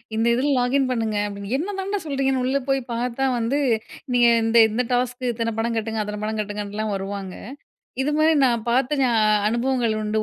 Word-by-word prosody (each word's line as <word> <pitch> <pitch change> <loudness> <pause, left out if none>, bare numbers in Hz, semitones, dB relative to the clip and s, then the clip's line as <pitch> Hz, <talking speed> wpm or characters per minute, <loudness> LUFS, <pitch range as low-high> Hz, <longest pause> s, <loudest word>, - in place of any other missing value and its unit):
இந்த 225 - +1
இதில 275 +4 0
லாகின் 260 +2 +1
பண்ணுங்க 225 -3 -1
அப்படின்னு, 200 +1 -6
என்னதாண்டா 390 +4 -3
சொல்கிறீங்கன்னு 270 -3 0
உள்ளே 275 +2 +1
போய் 270 0 +2
பார்த்தா 245 +2 -1
வந்து, 250 +6 0 0.5
நீங்க 240 -1 +5 0.2
இந்த 225 +1 +2
இந்த 225 +4 0
டாஸ்க்கு 245 0 0
இத்தன 230 -1 -2
பணம் 230 +1 -1
கட்டுங்க, 220 0 -2
அத்தன 210 0 -5
பணம் 220 0 -2
கட்டுங்கன்லாம் 210 0 -4
வருவாங்க. 195 -1 -5 0.7
இது 290 - 0
மாரி 315 +1 +4
நான் 235 -2 0
பார்த்து 265 +4 +1
ஞா 255 - +3 0.4
அனுபவங்கள் 235 0 0
உண்டு. 215 +1 -2
235 Hz, 170 wpm, -23 LUFS, 215-265 Hz, 0.7 s, நீங்க